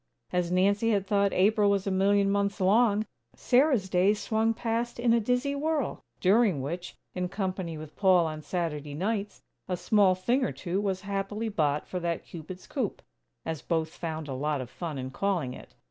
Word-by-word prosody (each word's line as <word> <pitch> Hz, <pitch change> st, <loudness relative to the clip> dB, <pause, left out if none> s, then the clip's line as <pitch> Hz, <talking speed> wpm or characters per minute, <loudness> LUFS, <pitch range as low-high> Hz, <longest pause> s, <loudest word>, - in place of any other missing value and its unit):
As 180 Hz, -1 st, +1 dB
Nancy 200 Hz, +5 st, +3 dB
had 200 Hz, -3 st, +1 dB
thought 200 Hz, 0 st, +2 dB
April 205 Hz, +2 st, +3 dB
was 200 Hz, -1 st, +1 dB
"a 195 Hz, -, 0 dB
million 200 Hz, +1 st, +3 dB
months 200 Hz, +1 st, 0 dB
long," 210 Hz, +2 st, +3 dB, 0.3 s
Sarah's 255 Hz, -5 st, +3 dB
days 190 Hz, +3 st, +3 dB
swung 220 Hz, +2 st, +1 dB
past 230 Hz, +1 st, -2 dB
in 235 Hz, -1 st, +3 dB
a 235 Hz, -, +4 dB
dizzy 250 Hz, +5 st, 0 dB
whirl; 300 Hz, 0 st, -1 dB, 0.2 s
during 195 Hz, -, +4 dB
which, 170 Hz, +7 st, -5 dB, 0.2 s
in 180 Hz, 0 st, -2 dB
company 185 Hz, -4 st, -3 dB
with 155 Hz, -1 st, -10 dB
Paul 185 Hz, -3 st, +4 dB
on 155 Hz, -1 st, -4 dB
Saturday 150 Hz, -4 st, -3 dB
nights, 205 Hz, +4 st, -2 dB, 0.2 s
a 180 Hz, -2 st, -1 dB
small 190 Hz, +1 st, +4 dB
thing 240 Hz, +9 st, +1 dB
or -, -, 0 dB
two 185 Hz, +2 st, -2 dB
was 190 Hz, -2 st, -1 dB
happily 200 Hz, +3 st, -3 dB
bought 150 Hz, -7 st, 0 dB
for 180 Hz, -, -3 dB
that 170 Hz, -1 st, -2 dB
"Cupid's 180 Hz, +2 st, -9 dB
Coop," 255 Hz, -9 st, -3 dB, 0.4 s
as 160 Hz, -2 st, -3 dB
both 160 Hz, -2 st, -1 dB
found 160 Hz, -2 st, -5 dB
a 135 Hz, -, -4 dB
lot 145 Hz, +2 st, -1 dB
of 125 Hz, -1 st, -6 dB
fun 165 Hz, -5 st, -5 dB
in 130 Hz, 0 st, -5 dB
calling 175 Hz, -6 st, -1 dB
it. -, -, -13 dB
195 Hz, 185 wpm, -28 LUFS, 170-215 Hz, 0.4 s, a